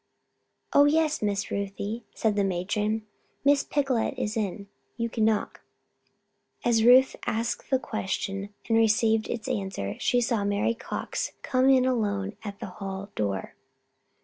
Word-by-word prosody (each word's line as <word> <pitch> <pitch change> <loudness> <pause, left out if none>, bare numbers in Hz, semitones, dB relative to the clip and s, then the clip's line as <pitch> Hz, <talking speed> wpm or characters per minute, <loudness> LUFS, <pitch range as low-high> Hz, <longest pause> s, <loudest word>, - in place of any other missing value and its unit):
"Oh, 285 - +7
yes, 310 +1 +2
Miss 200 -1 -1
Ruthie," 200 +3 -3
said 220 -2 +1
the 205 - +2
matron. 210 +4 -1 0.4
"Miss 280 0 +5
Picolet 270 -5 0
is 210 - -2
in. 200 -2 -3 0.3
You 230 -1 -1
can 220 -2 +1
knock." 220 -1 0 1.0
As 230 -2 +3
Ruth 255 +3 +7
asked 230 +2 -2
this 265 -1 +2
question 195 -1 -3 0.2
and 225 - +3
received 220 0 +3
its 230 -2 -4
answer 190 - -3
she 245 - +2
saw 230 -3 0
Mary 205 +3 +1
Cox - - -4
come 255 +1 +3
in 260 -1 +5
alone 205 -5 0
at 200 -2 -7
the - - -5 0.2
hall 195 +1 -5
door. 100 -3 -2
220 Hz, 145 wpm, -27 LUFS, 200-240 Hz, 1.0 s, Oh